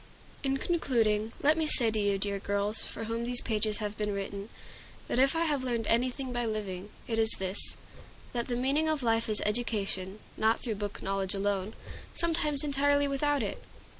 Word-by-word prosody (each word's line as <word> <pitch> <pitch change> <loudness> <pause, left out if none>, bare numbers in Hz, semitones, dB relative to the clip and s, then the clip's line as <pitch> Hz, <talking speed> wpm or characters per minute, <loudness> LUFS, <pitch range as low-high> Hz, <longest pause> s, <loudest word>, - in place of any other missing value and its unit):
In 270 -1 0
concluding, 225 -10 +1
let 300 +2 +5
me 315 - +1
say 235 -6 +5
to 215 - -1
you, 200 -1 +1
dear 200 0 -1
girls, 200 +2 0
for - - -6
whom 230 +1 -3
these 245 +1 +3
pages 215 -2 +3
have 210 -1 -3
been 210 -1 0
written, 200 +1 -5 0.6
that - - 0
if 270 +4 +4
I 330 +1 +1
have 290 -4 0
learned 235 -3 -1
anything 250 +3 0
by 240 0 -1
living, 205 -4 -4 0.2
it 225 -1 -1
is 220 0 +3
this, 190 +1 -1 0.6
that 240 -1 -2
the 245 - -1
meaning 275 +6 +1
of 305 -4 0
life 225 -1 +1
is 215 - +1
education; 205 -3 -1 0.2
not 220 +1 +2
through 230 - -1
book 205 -1 -5
knowledge 195 0 -1
alone, 200 +1 -1 0.4
sometimes 305 -4 +3
entirely 285 0 +3
without 280 -1 +1
it. 200 - -4
225 Hz, 185 wpm, -30 LUFS, 205-270 Hz, 0.6 s, let